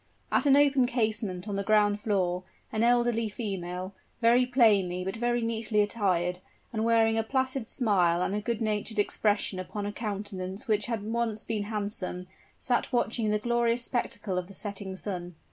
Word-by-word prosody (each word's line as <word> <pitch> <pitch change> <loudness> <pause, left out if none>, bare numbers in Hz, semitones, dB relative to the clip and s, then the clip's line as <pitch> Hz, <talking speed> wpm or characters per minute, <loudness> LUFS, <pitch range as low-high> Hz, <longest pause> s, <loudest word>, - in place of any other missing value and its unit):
At - - +2
an 275 - +7
open 280 -3 +4
casement 215 -6 -1
on 200 -1 -2
the 200 - -1
ground 210 0 +3
floor, 185 -5 0 0.3
an 215 - -1
elderly 240 -1 +3
female, 185 -3 -4 0.3
very 240 +2 +4
plainly 205 -8 +3
but 190 - -3
very 240 +1 0
neatly 225 -1 0
attired, 180 -4 0 0.3
and 220 -1 -1
wearing 225 -1 +3
a - - +1
placid 260 0 -1
smile 180 -9 +2
and 190 - -1
a 210 - -1
good 235 +1 -2
natured 215 0 -1
expression 205 -2 +1
upon 200 +2 -5
a 205 - -2
countenance 200 -3 -4
which 210 -1 +1
had 230 -4 -2
once 225 0 -1
been 215 -2 -2
handsome, 205 -4 -4 0.3
sat 245 +1 0
watching 235 -3 0
the 210 - +2
glorious 235 +1 +1
spectacle 205 -6 -2
of 180 - -6
the 195 - -12
setting 200 -2 -6
sun. 180 -3 -5
215 Hz, 170 wpm, -28 LUFS, 195-235 Hz, 0.3 s, an